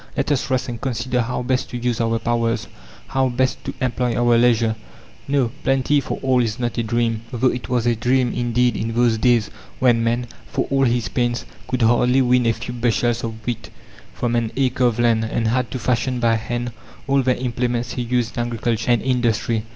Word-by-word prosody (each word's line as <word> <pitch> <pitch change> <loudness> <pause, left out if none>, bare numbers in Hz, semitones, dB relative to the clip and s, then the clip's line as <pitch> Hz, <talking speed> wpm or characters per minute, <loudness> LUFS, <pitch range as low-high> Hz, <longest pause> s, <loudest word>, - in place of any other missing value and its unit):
Let 145 +1 0
us 140 -2 0
rest 130 -1 0
and 120 -2 -6
consider 125 -1 -1
how 125 +1 -2
best 130 +1 -1
to 125 - -5
use 120 -1 -1
our 115 0 +1
powers, 115 0 -1 0.4
how 135 -1 +1
best 130 +1 0
to - - -4
employ 125 -1 0
our 120 0 +3
leisure." 115 -2 +3 0.5
No, 135 -4 +1
plenty 135 +2 +2
for 130 - -4
all 130 -2 +3
is 115 -1 -1
not 120 -2 -2
a - - +3
dream 115 0 0
though 125 +1 +2
it 125 - -6
was 125 -2 +1
a 120 -1 +3
dream 125 +2 +1
indeed 120 -1 +1
in 115 +1 -3
those 120 -2 +3
days 120 -3 +2 0.3
when 120 -3 +3
man, 120 +1 0 0.2
for - - -1
all 135 -1 +3
his 120 -4 +1
pains, 120 +4 -1 0.2
could 130 -2 0
hardly 125 +3 +4
win 125 -1 +3
a 115 - +3
few 120 +3 -6
bushels 120 0 0
of 115 -1 -6
wheat 120 -2 -4 0.4
from 120 -1 -2
an 115 -1 0
acre 130 -1 +1
of 120 -2 +2
land, 115 -2 +3
and 115 0 -1
had 125 0 0
to 130 - -4
fashion 125 +1 0
by 115 -1 +3
hand 120 +2 -3 0.4
all 135 0 +3
the 130 -1 +1
implements 120 -1 -1
he 125 - -3
used 120 -1 -1
in 120 - 0
agriculture 115 0 -2
and 120 -3 +3
industry. 115 -3 0
120 Hz, 205 wpm, -21 LUFS, 115-125 Hz, 0.5 s, hardly